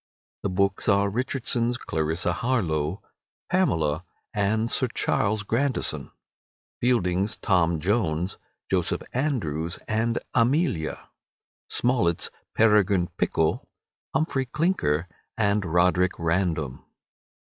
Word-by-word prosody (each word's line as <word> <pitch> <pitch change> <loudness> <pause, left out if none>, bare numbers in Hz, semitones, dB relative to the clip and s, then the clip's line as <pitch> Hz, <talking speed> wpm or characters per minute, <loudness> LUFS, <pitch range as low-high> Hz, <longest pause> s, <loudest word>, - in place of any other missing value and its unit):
The 100 - -1
books 100 +3 +1
are: 100 0 +3
Richardson's 120 0 0
"Clarissa 80 +1 -1
Harlowe," 85 - -1 0.5
"Pamela," 80 - +1 0.3
and 110 +3 +1
"Sir 130 - +1
Charles 110 -2 0
Grandison"; 130 +5 -1 0.7
Fielding's 100 -4 +1
"Tom 85 -5 +2
Jones", 90 -1 0 0.3
"Joseph - - +1
Andrews," 85 - -1
and 115 +1 0 0.2
"Amelia"; 120 - +1 0.6
Smollett's 120 -10 +1 0.2
"Peregrine 100 -5 +4
Pickle," 80 -1 +1 0.4
"Humphrey 140 -4 0
Clinker," 125 - 0 0.3
and 100 -1 +2
"Roderick 90 +1 +3
Random." 80 -5 -1
100 Hz, 90 wpm, -26 LUFS, 85-120 Hz, 0.7 s, Peregrine